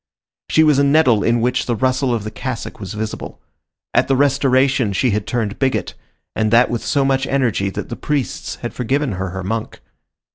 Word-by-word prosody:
She 160 - +4
was 150 -3 +4
a - - +4
nettle 140 -7 +4
in 120 0 +2
which 125 +2 0
the 120 - 0
rustle 130 +3 +1
of 115 -3 -1
the 110 - -5
cassock 130 -1 -5
was 100 +1 -6
visible. 110 0 -5 0.5
At - - +3
the 135 - +2
Restoration 135 -4 +2
she 125 +5 +1
had 105 0 -2
turned 110 -3 -2
bigot, 130 -8 0 0.4
and 110 0 +1
that 115 +3 +4
with 120 - -2
so 140 -3 +1
much 135 0 +1
energy 120 -7 0
that - - -6
the - - -4
priests 145 -4 -3
had 120 - -4
forgiven 135 +2 -1
her 95 -1 -3
her 95 +1 -5
monk. 110 +3 -4
125 Hz, 195 wpm, -19 LUFS, 110-135 Hz, 0.5 s, She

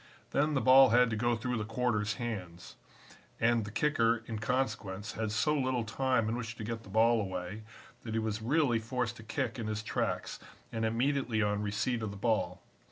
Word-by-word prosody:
Then, 150 +1 +1
the 135 - +2
ball 130 0 +8
had 120 +1 +4
to - - 0
go 120 +2 +1
through 125 +2 -2
the - - -1
quarter's 110 -2 0
hands, 95 -8 -6 0.6
and 115 -2 +2
the 105 - -7
kicker 115 -4 +2
in 110 -2 -5
consequence 105 -4 -2
had 110 -1 -3
so 150 +8 +2
little 130 -4 0
time 120 0 0
in 115 - -1
which 115 -2 -5
to 110 - -7
get 115 +1 -4
the 100 - -14
ball 115 +2 +4
away 95 +1 -5 0.4
that 110 -1 -5
he - - +2
was 110 -1 -2
really 125 -1 +2
forced 120 +1 -2
to 110 - -11
kick 115 +2 -3
in 110 - -3
his 110 0 -3
tracks - - -2 0.3
and 115 0 -1
immediately 120 -1 +1
on 105 0 0
receipt 105 +4 -1
of 110 - -2
the 100 - -8
ball. 100 -5 0
115 Hz, 200 wpm, -31 LUFS, 105-125 Hz, 0.6 s, ball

